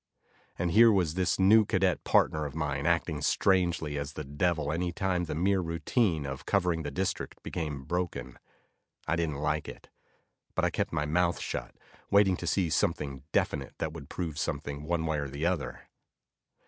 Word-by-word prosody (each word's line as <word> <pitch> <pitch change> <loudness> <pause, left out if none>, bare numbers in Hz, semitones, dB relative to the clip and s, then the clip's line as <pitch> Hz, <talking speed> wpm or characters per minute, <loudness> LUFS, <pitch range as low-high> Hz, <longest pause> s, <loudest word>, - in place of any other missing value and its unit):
And 85 0 0
here 115 +4 +7
was 90 -6 +2
this 90 0 +1
new 105 +4 +6
cadet 95 -3 +1
partner 75 -1 +2
of 70 - -10
mine 75 -1 -1
acting 85 -3 +1
strangely 85 -6 +1
as 70 +2 -5
the 75 - -5
devil 75 +2 0
any 85 +2 -1
time 95 -2 0
the 80 - -4
mere 95 +4 +2
routine 85 - 0
of 70 +1 -6
covering 90 -4 +1
the 75 - -3
district 95 +7 -3
became 75 -5 -4
broken. 85 -5 -3 0.7
I - - +2
didn't 85 -3 -1
like 75 +2 -1
it, - - -12 0.7
but - - +2
I - - +1
kept - - -1
my 75 - 0
mouth 85 +3 +1
shut, - - -4 0.3
waiting 100 -2 +5
to 85 - -5
see 85 -1 +1
something 70 -2 -1
definite 70 -2 -1
that 80 -1 -3
would 75 -4 -9
prove 80 -4 -4
something 70 +1 -3
one 85 0 0
way 80 -2 0
or 70 -1 -3
the 70 +4 -3
other. 75 -8 -2
80 Hz, 175 wpm, -29 LUFS, 75-90 Hz, 0.7 s, here